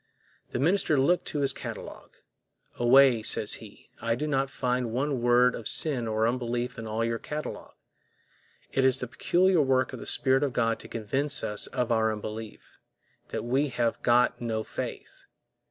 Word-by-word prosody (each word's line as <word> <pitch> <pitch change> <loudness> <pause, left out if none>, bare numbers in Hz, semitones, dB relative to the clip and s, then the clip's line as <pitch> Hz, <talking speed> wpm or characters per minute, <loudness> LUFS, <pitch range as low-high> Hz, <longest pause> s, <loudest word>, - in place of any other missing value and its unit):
The - - -4
minister 160 +2 +2
looked 170 +7 +2
to 145 - -3
his 135 -1 +1
catalog. - - -8 0.7
Away, 125 0 +5
says - - +2
he, - - -15
I 115 0 0
do 150 - -3
not 135 -2 0
find 125 -2 -1
one 135 +1 -1
word 120 +1 +4
of 115 - -7
the - - +1
sin 130 -7 0
of 110 -1 -2
unbelief 120 0 -2
in 115 - -6
all 110 +1 -1
your 115 0 -2
catalog. 150 +1 -6 1.0
It 135 - +1
is 130 -1 +5
the - - -2
peculiar 180 +7 +2
work 130 -2 +1
of - - -6
the - - -7
Spirit 130 0 +2
of 140 -3 -1
God 115 -2 0
to - - -11
convince 135 +6 -1
us 105 0 -1
of 125 -2 -2
our 110 -1 +2
unbelief—that 110 +1 -9
we 135 +5 +1
have 120 -3 -1
got 120 +1 +2
no 110 -2 -2
faith. - - -7
125 Hz, 170 wpm, -27 LUFS, 115-135 Hz, 1.0 s, Away